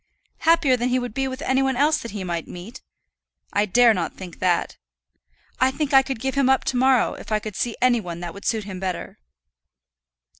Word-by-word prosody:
"Happier 320 -5 +4
than 245 0 -1
he 255 - +2
would 245 -3 -4
be 270 +2 -1
with 260 +1 -6
any 265 +1 +2
one 265 -1 +1
else 300 +4 +3
that 235 - -7
he 205 -2 -5
might 170 -2 -3
meet? 215 +9 -10 0.7
I 205 +1 +2
dare 240 +3 +5
not 175 -5 -3
think 180 -3 -10
that. 180 -2 0 0.8
I 260 - +4
think 280 +1 -3
I 270 - +8
could 265 -3 -5
give 265 +2 -2
him 275 -2 +2
up 265 - +3
to - - -2
morrow, 255 -1 +3
if - - -11
I 215 - +3
could 215 -1 -7
see 235 +2 -2
any 245 -2 +4
one 170 -3 -7
that 175 -1 -6
would 200 - -11
suit 220 -2 0
him 190 -2 -7
better." 185 - -5
245 Hz, 220 wpm, -23 LUFS, 195-265 Hz, 0.8 s, I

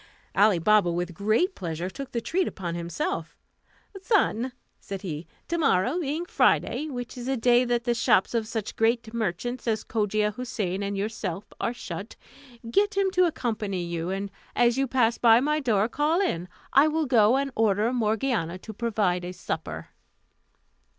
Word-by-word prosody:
Ali 205 -1 +5
Baba 200 +1 +4
with 175 +1 -2
great 220 - +1
pleasure 170 - -4
took 265 +8 -7
the 235 - -2
treat 360 +9 0
upon 175 -3 -4
himself. 170 -1 -3 0.6
"Son," 265 - +1 0.3
said 195 -1 -7
he, 160 -3 -5 0.2
"to 340 0 -1
morrow 275 - +2
being 315 +2 -2
Friday, 310 -3 +2
which 245 -3 -6
is 245 0 -6
a 265 0 0
day 245 +1 +4
that 240 -1 0
the 240 -1 +1
shops 235 - +2
of 225 -2 0
such 220 -2 -4
great 225 0 +1
merchants 235 +3 -3
as 220 -1 0
Cogia 210 -1 0
Houssain 205 -5 -3
and 200 0 -2
yourself 200 -3 -4
are - - 0
shut, 200 -3 -7 0.5
get 405 - +1
him 390 -1 +2
to 365 -1 +4
accompany 215 - -2
you, 170 0 -3
and 195 +1 -3 0.2
as 240 -1 +4
you 270 0 +1
pass 240 -2 +2
by 230 -1 +6
my 300 +4 +1
door, 220 -7 +2
call 300 +7 +1
in. 180 - -1 0.3
I 280 +3 +6
will 310 0 0
go 240 -2 +4
and 275 0 -1
order 220 +2 +2
Morgiana 220 -6 0
to 220 +4 -9
provide 205 -5 0
a 180 +1 -5
supper." 80 - -5
225 Hz, 170 wpm, -26 LUFS, 195-255 Hz, 0.6 s, by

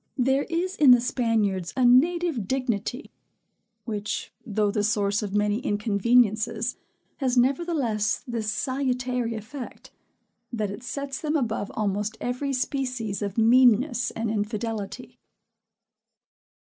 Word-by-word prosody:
There 265 +2 +2
is 355 +3 -1
in 290 -3 +5
the 245 -1 +9
Spaniards 220 -7 0
a 255 - +3
native 290 - +3
dignity; 250 +1 -2 0.7
which, 210 -3 -4
though 210 -2 0
the 210 -1 0
source 205 -1 +1
of 205 -1 -4
many 210 +1 +1
inconveniences, 220 +1 +1 0.4
has 260 -3 0
nevertheless 255 -5 +1
this 225 -3 -2
salutary 250 -1 -1
effect, 230 +5 -8 0.6
that 215 -4 -2
it 205 +4 -8
sets 275 +1 -5
them 305 0 -1
above 225 -7 -1
almost 210 +1 -1
every 250 +3 -2
species 255 -6 -2
of 200 0 -4
meanness 245 +2 +4
and 225 -1 -3
infidelity. 215 0 -4
235 Hz, 115 wpm, -25 LUFS, 210-260 Hz, 0.7 s, the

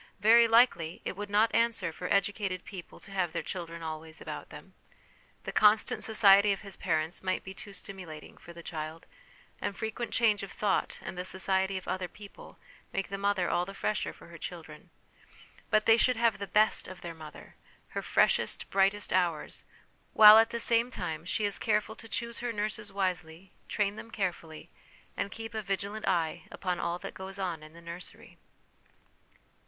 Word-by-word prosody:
Very 230 +3 +7
likely 225 -8 +4
it - - -3
would 205 +1 -6
not 215 +2 +3
answer 230 -7 +1
for 180 - -5
educated 200 -2 0
people 185 -4 -10
to - - -11
have 180 -4 -1
their 170 - -2
children 170 -1 -6
always 160 0 -6
about - - -7
them. - - -12 0.7
The - - -4
constant 215 +1 +4
society 205 -2 +6
of 195 - -2
his 195 -2 -8
parents 160 -1 -1
might 185 0 -1
be 190 - -8
too 205 - -9
stimulat 185 -5 -6
ing - - -15
for 170 - -12
the 170 0 -11
child; 160 0 -6 0.6
and 200 -1 -3
frequent 220 +1 -3
change 215 -3 +3
of 195 - -7
thought, 205 -3 0
and - - -6
the - - -2
society 190 +1 0
of 185 - -8
other 185 -1 -2
people, 205 +2 -13 0.3
make 195 - -2
the 195 - -3
mother 200 -3 +1
all 175 - +1
the 195 +2 -8
fresher 210 +1 -1
for - - -15
her - - -11
children. - - -8 0.8
But 215 0 +3
they 225 0 +6
should 255 +1 +3
have 225 -3 +2
the 200 - -4
best 215 +2 +3
of 185 -1 -10
their 170 -1 -6
mother, 155 -2 -12 0.4
her - - -3
freshest, - - +1
brightest 195 +1 +2
hours; 175 -4 0 0.5
while, 215 0 +10
at 225 - +4
the 235 0 -3
same 230 +1 +3
time, 165 -8 -5
she 210 +4 0
is 205 - 0
careful 215 0 0
to 225 - -10
choose 235 +2 -3
her 245 0 -2
nurses 210 -1 -2
wisely, 185 -2 -3 0.2
train 205 0 0
them 225 - -9
carefully, 175 -7 -4 0.4
and - - -2
keep 225 +2 -7
a 220 - -2
vigilant 200 +2 -3
eye 165 -2 0
upon 180 -2 -3
all 170 +1 -1
that - - -8
goes 190 +1 -6
on 180 -5 -3
in 155 0 -13
the 170 - -13
nursery. 170 +2 -10
195 Hz, 185 wpm, -30 LUFS, 175-215 Hz, 0.8 s, while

